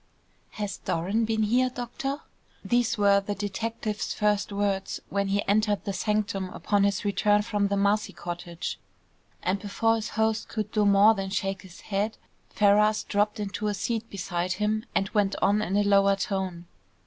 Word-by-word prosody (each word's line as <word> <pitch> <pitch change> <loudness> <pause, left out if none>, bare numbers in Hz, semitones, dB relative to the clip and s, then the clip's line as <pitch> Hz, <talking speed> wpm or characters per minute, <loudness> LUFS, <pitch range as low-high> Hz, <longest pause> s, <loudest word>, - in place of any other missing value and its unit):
"Has 205 -1 -4
Doran 195 +7 -1
been 220 0 0
here, 250 +4 +3
doctor?" 255 +4 -4 0.4
These 240 -1 +1
were 200 -1 +4
the 205 +1 -4
detective's 210 +1 -3
first 210 -1 +1
words 200 -1 -1
when 200 0 0
he 200 +1 0
entered 210 0 +2
the 200 - -2
sanctum 205 -2 -1
upon 200 +2 +1
his 200 0 0
return 205 +1 +3
from 205 -2 0
the 200 0 0
Marcy 205 +2 +1
cottage, 175 0 -6 0.6
and 190 +2 0
before 220 +3 +1
his 220 - -4
host 220 0 +1
could 215 -2 -3
do 210 -2 +2
more 200 +2 +6
than 195 -2 -4
shake 195 -1 -2
his 180 -3 -14
head, 205 +2 -2 0.3
Ferrars 210 +1 +3
dropped 210 +1 0
into 205 +1 -3
a 205 - 0
seat 230 +1 -2
beside 180 -2 -2
him 215 +3 -1
and 195 - +1
went 200 -2 +1
on 205 +1 +3
in 200 -1 0
a 205 - +3
lower 200 -1 +4
tone. 190 -3 -3
205 Hz, 170 wpm, -27 LUFS, 195-215 Hz, 0.6 s, more